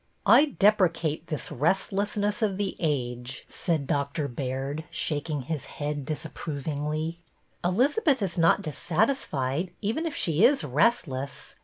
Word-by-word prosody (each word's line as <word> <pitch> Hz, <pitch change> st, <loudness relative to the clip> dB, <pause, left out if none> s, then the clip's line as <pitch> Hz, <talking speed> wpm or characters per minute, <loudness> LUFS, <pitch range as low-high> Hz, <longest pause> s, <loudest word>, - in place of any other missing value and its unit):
" -, -, -40 dB, 0.2 s
I -, -, +5 dB
deprecate 170 Hz, -6 st, +2 dB
this 155 Hz, -5 st, -4 dB
restlessness 200 Hz, -, 0 dB
of 200 Hz, -4 st, +1 dB
the 200 Hz, -1 st, -2 dB
age," 125 Hz, -4 st, -2 dB
said 160 Hz, -5 st, -1 dB
Doctor 140 Hz, +1 st, -1 dB
Baird, 135 Hz, +4 st, -3 dB
shaking 150 Hz, -2 st, -2 dB
his 150 Hz, +1 st, -4 dB
head 145 Hz, -2 st, -3 dB
disapprovingly. 155 Hz, +1 st, -3 dB, 0.2 s
'' -, -, -40 dB
Elizabeth 260 Hz, -, +2 dB
is 185 Hz, -3 st, -2 dB
not 165 Hz, -1 st, +4 dB
dissatisfied, 160 Hz, -, 0 dB
even 225 Hz, +11 st, -1 dB
if 310 Hz, -, -4 dB
she 165 Hz, +3 st, +2 dB
is 265 Hz, -, +5 dB
restless. 140 Hz, -, 0 dB
160 Hz, 130 wpm, -27 LUFS, 140-200 Hz, 0.2 s, I